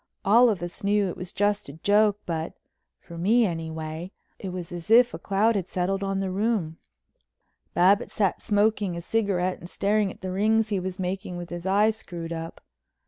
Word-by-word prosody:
All 235 +5 +6
of 195 -5 -2
us 175 +2 -7
knew 200 -1 +2
it - - -5
was 180 0 -7
just 205 -4 0
a - - -8
joke, 205 +5 +3
but—for 165 0 -8
me, 225 +7 +4
anyway—it 165 +2 -6
was 180 -2 -6
as 175 +2 -7
if 240 +2 +6
a - - -6
cloud 210 +4 +2
had 190 -3 -1
settled 190 +2 -1
on 195 0 -1
the 190 -1 -2
room. 195 -5 -1 1.0
Babbitts 190 +3 +3
sat 195 -4 +1
smoking 205 -3 +1
a - - -4
cigarette 185 -4 0
and 175 - -10
staring 205 0 +1
at - - -15
the 185 0 -4
rings 215 +3 +2
he 200 -3 0
was 185 0 -5
making 185 0 -4
with 175 0 -7
his 175 +1 -5
eyes 210 +3 +3
screwed 170 -5 -7
up. 165 0 -7
190 Hz, 185 wpm, -26 LUFS, 175-210 Hz, 1.0 s, All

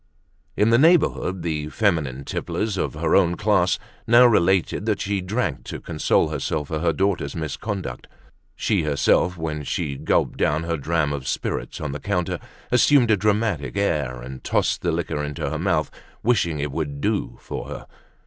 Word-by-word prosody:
In 105 +2 +4
the 115 - +5
neighborhood 145 - +3
the 75 -3 -2
feminine 75 - 0
tipplers 105 -2 -2
of 95 - -2
her 80 +1 +1
own 90 -3 +4
class - - +2 0.3
now 120 +2 +7
related 95 -2 +2
that 105 - +1
she 100 -1 -1
drank 90 - -2
to - - -6
console 80 -2 +1
herself 75 -3 -2
for 80 - -2
her 85 +1 +2
daughter's 95 +4 -1
misconduct. 85 +6 -4 0.5
She - - +1
herself, 75 +4 +2
when 80 -2 -3
she 70 0 -2
gulped - - 0
down 75 +2 +1
her 85 0 -1
dram 75 0 0
of 70 -3 -5
spirits - - -3
on 75 -3 -3
the 75 - -5
counter, 90 0 -1 0.3
assumed 125 -1 +5
a - - +6
dramatic 105 -5 0
air, 70 -11 -1
and 65 +1 -9
tossed - - +1
the - - 0
liquor 75 - -2
into 75 -1 -3
her 80 - -3
mouth, 85 -4 0 0.3
wishing 100 -9 +2
it 70 0 -2
would 70 -1 -3
"do" - - -1
for - - -6
her. - - -7
85 Hz, 170 wpm, -23 LUFS, 75-100 Hz, 0.5 s, now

